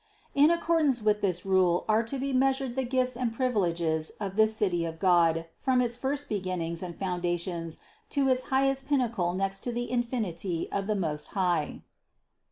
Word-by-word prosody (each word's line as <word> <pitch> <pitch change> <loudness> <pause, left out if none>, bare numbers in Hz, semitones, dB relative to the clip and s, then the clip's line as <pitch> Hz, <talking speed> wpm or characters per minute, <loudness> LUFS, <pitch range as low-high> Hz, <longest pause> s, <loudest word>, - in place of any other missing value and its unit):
In 290 +2 +5
accordance 325 -7 +2
with 210 0 +2
this 185 -3 -1
rule 185 -2 +2
are 215 +1 +3
to 235 +4 -4
be 270 +1 -2
measured 265 -1 +1
the 265 - 0
gifts 255 0 0
and 245 -1 -1
privileges 175 -10 0
of 195 -2 -4
this 220 0 +3
City 175 -5 +1
of 165 -1 -4
God 165 -2 +3
from 260 -2 +2
its 240 -1 +2
first 280 +3 -2
beginnings 180 -5 -3
and 175 -2 -6
foundations 175 -2 -2 0.3
to 280 -2 +1
its 255 -1 +1
highest 270 0 +1
pinnacle 230 -11 0
next 195 +1 -1
to 245 - -3
the 240 0 -3
infinity 205 -9 -2
of 195 0 -2
the 215 - +1
Most 155 -6 -2
High. 175 -5 0
210 Hz, 175 wpm, -28 LUFS, 175-255 Hz, 0.3 s, In